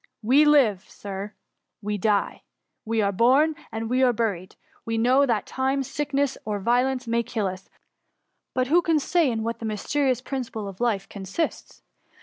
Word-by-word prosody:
We 270 +7 +5
live^ 245 -10 +3
Sir, 200 +1 -7 0.2
— - - -57
we 210 0 -2
die: 205 +1 0 0.4
we 225 -1 0
are 200 - +1
born, 265 +10 +3 0.2
and 225 0 -4
we 250 +3 +1
are 255 -1 +5
buried: 205 -6 -3 0.3
we 225 0 -2
know 255 +5 +4
that 230 -4 0
time, 265 +1 -1
sick 290 +2 -4
ness, 275 -1 0
or 210 -1 -2
violence, 250 +4 +1
may 235 0 +1
kill 230 -3 -3
us; 185 0 -5 0.9
but 255 - +2
who 330 +7 +4
can 330 -2 +2
say 315 +1 +2
in 225 -2 -2
what 230 0 -3
the 230 - -6
mysterious 255 +4 0
principle 250 -5 -5
of 195 +2 -9
life 220 -5 0
consists 200 - -5
235 Hz, 175 wpm, -25 LUFS, 210-270 Hz, 0.9 s, We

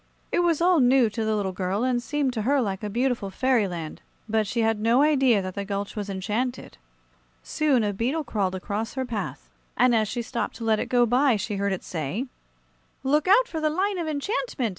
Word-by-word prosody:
It - - +1
was 340 -2 +2
all 355 -1 +4
new 250 -3 +4
to 225 +2 -3
the 220 0 0
little 200 -2 -1
girl, 185 +4 -2
and 250 -1 +1
seemed 275 +1 -1
to 225 - -2
her 275 +6 +2
like 195 -6 -2
a 210 - -2
beautiful 240 -2 -1
fairyland; 195 -8 -1 0.3
but 220 -1 +1
she 235 +3 -1
had 225 -1 +1
no 230 +5 +3
idea 265 -9 +3
that 185 0 -5
the 200 - -4
gulch 200 0 -4
was 205 -2 -4
enchanted. 215 +6 -3 0.6
Soon 290 -7 +1
a 205 -1 0
beetle 255 +10 -1
crawled 200 -7 -1
across 205 +5 -4
her 260 -1 -2
path, 230 -4 -5 0.3
and 250 0 +4
as 220 -2 +2
she 240 +3 -3
stopped 235 +1 -3
to 230 - -8
let 220 -1 +2
it - - -2
go 245 -1 +4
by, 250 +2 +3
she 205 0 -3
heard 200 0 0
it 190 - -3
say: 165 - -3 0.8
"Look 290 +4 +2
out 470 +6 +5
for 320 -7 -4
the 310 - +2
line 380 +4 -1
of 335 - -3
enchantment! 305 - -2
235 Hz, 215 wpm, -25 LUFS, 205-270 Hz, 0.8 s, out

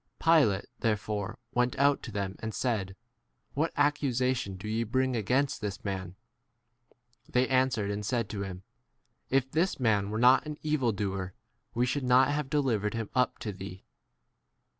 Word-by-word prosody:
Pilate 150 -13 +4
there 110 -2 +2
fore 105 +2 -4 0.2
went 125 0 +1
out 140 +1 +3
to 120 - -7
them 100 -2 -3
and 110 0 -5
said, 100 -7 -1 0.6
What 155 +4 0
accusation 130 -7 +1
do 100 +3 -8
ye 110 +2 0
bring 130 +4 +1
30 120 - 0
against 130 +7 0
this 105 -1 -5
man? 95 -2 -4 1.1
They 125 +1 +2
answered 130 -6 +1
and 105 +1 -3
said 115 +1 -1
to 100 - -4
him, 95 -1 -6 0.7
If 135 0 +1
this 170 +2 +1
[man] 105 -5 +2
were 110 - -2
not 125 +5 +5
an 150 -1 -5
evildoer 105 -11 -1 0.4
we 120 +1 +2
should 135 +2 -1
not 125 +1 +5
have 145 -2 -2
delivered 120 -8 0
him 115 -2 -4
up 125 -1 +1
to 105 - -1
thee. 95 -1 -9
115 Hz, 160 wpm, -29 LUFS, 100-130 Hz, 1.1 s, not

